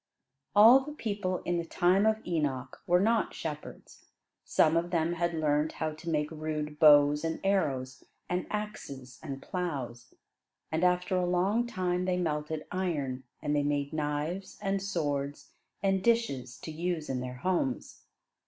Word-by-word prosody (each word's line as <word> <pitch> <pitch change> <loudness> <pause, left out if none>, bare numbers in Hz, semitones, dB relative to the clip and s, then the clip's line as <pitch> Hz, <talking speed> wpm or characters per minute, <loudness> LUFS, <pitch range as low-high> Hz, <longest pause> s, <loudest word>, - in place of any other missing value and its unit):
All 225 +6 +9
the 295 +3 -7
people 205 -8 -2
in 175 0 0
the - - -2
time 185 +5 +3
of 220 0 +1
Enoch 140 -7 -2
were 175 +1 +5
not 225 +3 +1
shepherds. 150 -2 -8 0.4
Some 155 +1 +3
of 170 +1 +1
them 170 -1 +1
had 170 0 -1
learned 150 -1 +1
how 160 0 -2
to 155 +2 -7
make 150 -1 0
rude 150 -1 -4
bows 145 -1 +6
and 165 0 -2
arrows 135 -10 0 0.2
and 180 +1 -2
axes 140 - -6
and 140 -3 -6
plows. 135 - -4 0.6
And 160 +2 0
after 180 +1 +2
a 180 -1 +1
long 195 +7 +2
time 180 -5 -1
they 180 -1 +1
melted 155 -2 -2
iron, 145 -9 -2 0.2
and 150 -1 0
they 145 - +3
made 145 0 -1
knives 155 +5 -3
and 195 0 -1
swords 145 -7 -2 0.3
and 195 -1 +2
dishes 140 - +1
to 160 - -6
use 165 0 -2
in 130 -1 -2
their 125 0 -5
homes. 135 -2 -2
165 Hz, 155 wpm, -30 LUFS, 145-185 Hz, 0.6 s, All